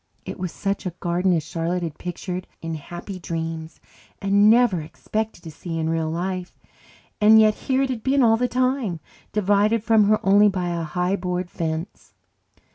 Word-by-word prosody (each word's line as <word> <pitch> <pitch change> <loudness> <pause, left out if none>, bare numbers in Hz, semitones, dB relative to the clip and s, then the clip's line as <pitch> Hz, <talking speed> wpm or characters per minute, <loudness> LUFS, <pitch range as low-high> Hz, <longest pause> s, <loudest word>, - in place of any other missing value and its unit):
It - - -7
was 180 -2 -3
such 195 -1 -3
a 175 - -6
garden 180 +1 +1
as 165 -3 0
Charlotte 170 +2 -2
had 160 -3 -5
pictured 180 +1 -5
in 165 0 -5
happy 175 +5 -7
dreams 165 -1 -5 0.4
and 200 +1 +4
never 225 -7 +4
expected 215 +6 -4
to 160 - -8
see 165 +2 -6
in 160 0 -1
real 165 -1 -1
life. 180 +2 -4 0.6
And 220 +1 +8
yet 215 -1 +5
here 265 +4 0
it 265 - -1
had 235 -3 -4
been 270 +3 +2
all 225 -1 +5
the 250 +2 0
time, 255 -8 0 0.3
divided 210 +2 +2
from 220 -1 +4
her 215 +1 +3
only 205 +2 +6
by 180 -3 -2
a 170 -1 -2
high 180 +4 -1
board 180 -1 -3
fence. 160 +3 -5
185 Hz, 180 wpm, -23 LUFS, 170-215 Hz, 0.6 s, And